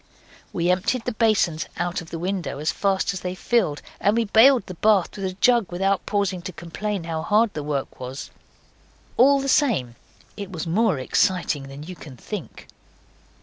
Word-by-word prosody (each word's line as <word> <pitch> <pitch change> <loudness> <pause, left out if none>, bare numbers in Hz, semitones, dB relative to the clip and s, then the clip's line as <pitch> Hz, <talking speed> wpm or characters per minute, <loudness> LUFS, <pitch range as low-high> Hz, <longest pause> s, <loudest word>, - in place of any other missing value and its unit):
We 175 0 +1
emptied 215 +7 0
the 250 - -1
basins 210 -8 +1
out 175 +1 -2
of 165 - -12
the 165 - -5
window 180 -3 -3
as 150 +2 0
fast 195 -1 0
as 190 - -4
they 180 0 -4
filled, 185 -8 0 0.2
and 205 +3 +2
we 230 - +2
baled 230 +3 +5
the 185 - -7
bath 200 +1 +2
with 195 - -4
a 185 - -4
jug 230 -1 +3
without 195 +1 0
pausing 200 -3 0
to 185 - -6
complain 185 +3 -4
how 165 -1 -3
hard 210 +5 +2
the 150 - -4
work 145 -2 -4
was. 130 +2 -7 0.8
All 275 +3 +5
the 275 - -3
same, 235 - +2 0.4
it 200 -2 -7
was 170 -3 -4
more 195 +1 +2
exciting 145 +1 0
than 135 +2 -9
you 180 +3 -8
can 140 -6 -12
think. 205 - -7
185 Hz, 185 wpm, -23 LUFS, 165-215 Hz, 0.8 s, baled